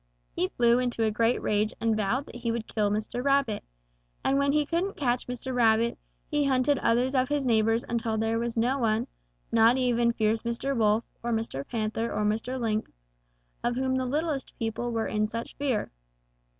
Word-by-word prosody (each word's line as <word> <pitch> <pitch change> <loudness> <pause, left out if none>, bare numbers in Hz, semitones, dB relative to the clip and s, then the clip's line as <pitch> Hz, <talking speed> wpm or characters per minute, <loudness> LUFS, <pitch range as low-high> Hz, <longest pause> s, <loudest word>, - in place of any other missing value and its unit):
He 185 - +1
flew 235 +4 +3
into 245 -2 0
a 220 - +2
great 230 +3 +2
rage 210 +1 +1
and 225 -1 +1
vowed 220 +6 0
that - - -10
he 235 -1 -2
would 230 -1 -3
kill 210 -2 0
Mr. 215 +4 -2
Rabbit, 275 -6 +1 0.6
and 275 +1 +2
when 280 0 +2
he 300 0 +2
couldn't 345 +6 -1
catch 245 -3 0
Mr. 250 +1 -4
Rabbit, 230 -1 +3 0.3
he 295 -2 +1
hunted 270 +1 +2
others 245 +3 +2
of 255 -1 +2
his 290 -2 0
neighbors 225 -1 +2
until 230 -1 -1
there 225 +1 0
was 235 0 -3
no 250 +4 +2
one, 220 -2 +1 0.5
not 230 +2 +5
even 240 -2 +2
fierce 220 -1 +1
Mr. 235 +4 -2
Wolf 220 -1 +3 0.2
or 235 - -2
Mr. 225 -12 -2
Panther 225 0 -2
or 210 - -1
Mr. 225 +5 -1
Lynx, 220 -2 -1 0.7
of 240 0 0
whom 260 +1 0
the 260 0 0
littlest 295 +1 -2
people 230 +1 -2
were 225 -1 -1
in 215 0 0
such 230 +2 -6
fear. 265 -7 -1
235 Hz, 190 wpm, -28 LUFS, 225-260 Hz, 0.7 s, not